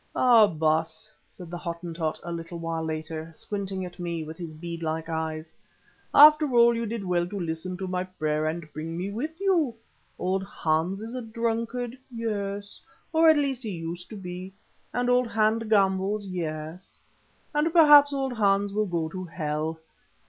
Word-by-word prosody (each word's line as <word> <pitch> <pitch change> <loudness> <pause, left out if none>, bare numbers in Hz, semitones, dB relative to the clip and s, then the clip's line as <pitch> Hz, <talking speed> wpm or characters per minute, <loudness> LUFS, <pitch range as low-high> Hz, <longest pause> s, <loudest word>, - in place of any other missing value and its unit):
"Ah! 235 -4 +6
Baas," 160 +3 -1 0.2
said 175 -2 -12
the 175 - -5
Hottentot 170 -2 -4
a 170 - -5
little 170 0 -6
while 165 -1 -3
later, 160 0 -4
squinting 195 -2 -4
at 175 0 -11
me 170 -2 -3
with 155 +1 -8
his 170 -1 -7
bead 170 +2 -7
like 160 0 -2
eyes, 160 -1 -4 0.6
"after 300 0 +8
all 235 0 +7
you 230 0 -2
did 225 -1 -4
well 175 -1 +1
to 200 +2 -5
listen 170 +2 -3
to 190 0 -4
my 180 0 -1
prayer 155 -4 -1
and 160 0 -3
bring 165 +2 -5
me 190 +3 -3
with 305 - -4
you. 345 -11 +2 0.4
Old 185 +1 0
Hans 175 +2 -1
is 225 +2 -7
a 255 - -3
drunkard, 230 +2 -2
yes, 205 -3 -4 0.3
or 320 0 +6
at 315 - +6
least 275 -3 0
he 225 - -5
used 170 -1 -6
to 220 - -8
be, 185 -1 -7 0.4
and 245 0 -1
old 250 0 +3
Hans 220 0 +1
gambles, 200 -1 +2
yes, 165 -1 -6 0.5
and 300 +2 +2
perhaps 295 -4 +8
old 270 -2 -1
Hans 200 -2 +2
will 210 0 +1
go 170 -3 -1
to 185 +2 -6
hell. 155 -1 -3
185 Hz, 170 wpm, -26 LUFS, 165-230 Hz, 0.6 s, after